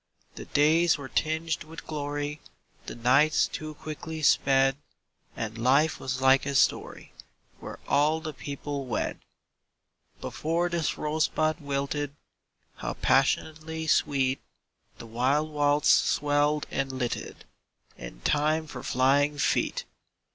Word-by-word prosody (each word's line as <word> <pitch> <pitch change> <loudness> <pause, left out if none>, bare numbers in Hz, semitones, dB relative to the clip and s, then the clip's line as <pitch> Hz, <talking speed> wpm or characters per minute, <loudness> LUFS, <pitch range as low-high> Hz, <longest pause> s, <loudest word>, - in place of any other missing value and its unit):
The - - -9
days 160 +3 +3
were 140 -2 -7
tinged 160 0 -1
with 160 +1 -11
glory, 145 0 -4 0.5
The - - -6
nights 135 +6 +3
too 155 0 -7
quickly 155 +1 -7
sped, 135 -1 +4 0.6
And 115 0 -5
life 140 +6 +3
was 130 0 -3
like 130 0 +5
a 140 - -2
story - - 0 0.5
Where - - -8
all 150 +3 +2
the 155 -1 -6
people 140 0 -5
wed. 115 - -2 1.0
Before 170 +3 -1
this 170 -3 -1
rosebud 155 +1 0
wilted, 140 0 -3 0.6
How - - -4
passionately 160 +4 0
sweet 135 -3 +1 0.6
The - - -10
wild 130 +7 0
waltz 145 0 +2
swelled 145 +1 +2
and 135 -1 -1
lilted 130 -2 -4 0.5
In - - -10
time 155 +2 +1
for 140 -5 -8
flying 140 +4 +2
feet! 140 - 0
145 Hz, 120 wpm, -27 LUFS, 135-155 Hz, 1.0 s, like